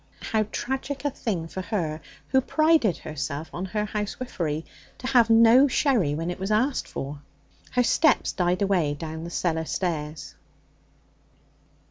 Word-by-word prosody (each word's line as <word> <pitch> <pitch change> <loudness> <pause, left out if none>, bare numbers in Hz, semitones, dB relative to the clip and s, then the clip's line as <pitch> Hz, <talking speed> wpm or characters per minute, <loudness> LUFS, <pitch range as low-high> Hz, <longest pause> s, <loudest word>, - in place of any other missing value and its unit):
How 215 -2 +2
tragic 265 +2 -3
a 290 - +1
thing 185 -10 -3
for 190 - -5
her, 165 -6 -2 0.3
who 265 - +4
prided 310 - +3
herself 145 0 -5
on 180 - -3
her 210 +2 -2
housewifery, 205 -7 -3 0.3
to - - -10
have 245 -3 +4
no 230 +4 +7
sherry 240 - +2
when 165 +3 -2
it 180 - -7
was 190 +1 -3
asked 250 +6 +1
for! 140 +1 -6 0.5
Her 250 - +3
steps 300 +2 +3
died 180 +1 0
away 175 -7 +1
down 160 +1 -6
the - - -5
cellar 160 -2 -1
stairs. 155 -4 -3
190 Hz, 145 wpm, -25 LUFS, 160-245 Hz, 0.5 s, no